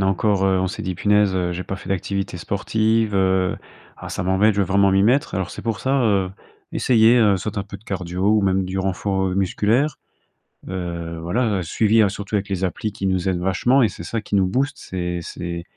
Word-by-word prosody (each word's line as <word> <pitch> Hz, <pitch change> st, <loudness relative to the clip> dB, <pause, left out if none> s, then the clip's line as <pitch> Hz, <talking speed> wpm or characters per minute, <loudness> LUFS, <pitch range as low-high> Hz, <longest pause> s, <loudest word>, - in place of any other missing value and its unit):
a 95 Hz, -, +2 dB
encore 95 Hz, 0 st, +1 dB
heu, 95 Hz, -1 st, +2 dB
on 95 Hz, -, 0 dB
s'est -, -, -6 dB
dit: 95 Hz, -, -3 dB
«Punaise, 105 Hz, +1 st, +2 dB
heu, 90 Hz, -1 st, 0 dB
j'ai 90 Hz, +1 st, -5 dB
pas 95 Hz, -, -4 dB
fait -, -, -11 dB
d'activité 95 Hz, 0 st, -2 dB
sportive, 110 Hz, +4 st, 0 dB
heu, 95 Hz, -1 st, +2 dB, 0.4 s
ah -, -, -9 dB
ça -, -, -3 dB
m'embête. 95 Hz, +4 st, +3 dB
Je 100 Hz, -, +1 dB
veux 95 Hz, -, +1 dB
vraiment 100 Hz, +1 st, +3 dB
m'y 95 Hz, 0 st, +4 dB
mettre» 130 Hz, +7 st, +2 dB
alors 95 Hz, -2 st, -2 dB
c'est -, -, -8 dB
pour 115 Hz, -2 st, -2 dB
ça, 135 Hz, +1 st, +1 dB
heu, 100 Hz, -4 st, +1 dB, 0.4 s
essayer, 115 Hz, -1 st, +4 dB
heu, 105 Hz, -4 st, +4 dB
soit 100 Hz, +2 st, -4 dB
un 100 Hz, -, -3 dB
peu 100 Hz, 0 st, -9 dB
de 100 Hz, -, -22 dB
cardio 90 Hz, 0 st, -2 dB
ou 110 Hz, -1 st, +3 dB
même 95 Hz, 0 st, +1 dB
du 95 Hz, +1 st, -3 dB
renfort, 95 Hz, 0 st, -1 dB
heu, -, -, -2 dB
musculaire. 105 Hz, +9 st, +1 dB, 0.7 s
Heu, 85 Hz, -2 st, -5 dB
voilà, 105 Hz, +4 st, 0 dB
heu, -, -, -2 dB
suivi 110 Hz, +6 st, +2 dB
hein, 105 Hz, -, +4 dB
surtout 100 Hz, +1 st, -5 dB
avec 100 Hz, 0 st, -1 dB
les 95 Hz, -1 st, -2 dB
applis 105 Hz, +4 st, -3 dB
qui 95 Hz, -, -5 dB
nous 95 Hz, 0 st, 0 dB
aident 90 Hz, -2 st, -1 dB
vachement 120 Hz, +8 st, +2 dB
et -, -, +4 dB
c'est 90 Hz, -4 st, -8 dB
ça 115 Hz, +6 st, -3 dB
qui 105 Hz, -, -3 dB
nous 95 Hz, -1 st, +3 dB
booste. 135 Hz, +8 st, -1 dB
C'est 90 Hz, -1 st, -4 dB
c'est 85 Hz, +1 st, -6 dB
95 Hz, 230 wpm, -21 LUFS, 95-105 Hz, 0.7 s, m'y